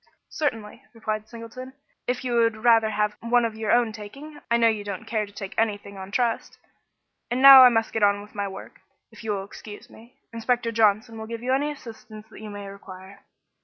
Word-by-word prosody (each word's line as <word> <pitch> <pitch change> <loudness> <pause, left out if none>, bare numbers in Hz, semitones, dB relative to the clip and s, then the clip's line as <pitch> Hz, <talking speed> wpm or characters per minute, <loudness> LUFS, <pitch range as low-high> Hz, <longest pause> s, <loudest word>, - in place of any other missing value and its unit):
"Certainly," 230 -6 -3
replied 215 -1 -4
Mr. - - -29
Singleton, 245 +3 -9 0.3
"if 250 +1 -2
you 245 - -1
would 230 -2 +1
rather 225 -2 +5
have 210 0 -1
one 235 +1 +2
of 225 - -3
your 220 -1 -2
own 240 -2 +3
taking. 275 +9 -10
I 235 - +3
know 230 -1 +4
you 215 -2 0
don't 200 -3 -6
care 215 -2 -2
to - - -15
take 195 -1 -8
anything 205 -2 -2
on 190 0 -8
trust. 230 +2 -1 0.7
And 245 +2 -1
now 270 0 +11
I 250 - +9
must 225 -2 0
get 225 - -1
on 205 0 +3
with 210 - -16
my 200 -1 -3
work, 195 - -11 0.3
if - - -14
you 220 - -6
will 195 -1 -3
excuse 205 +1 -12
me. 235 +3 -17 0.2
Inspector 230 0 -1
Johnson 225 +1 +1
will 220 - -7
give 230 0 -7
you 255 +1 0
any 285 +3 +1
assistance 220 -5 -11
you 215 -1 -10
may 205 -1 -8
require." 195 0 -12
225 Hz, 210 wpm, -24 LUFS, 205-235 Hz, 0.7 s, now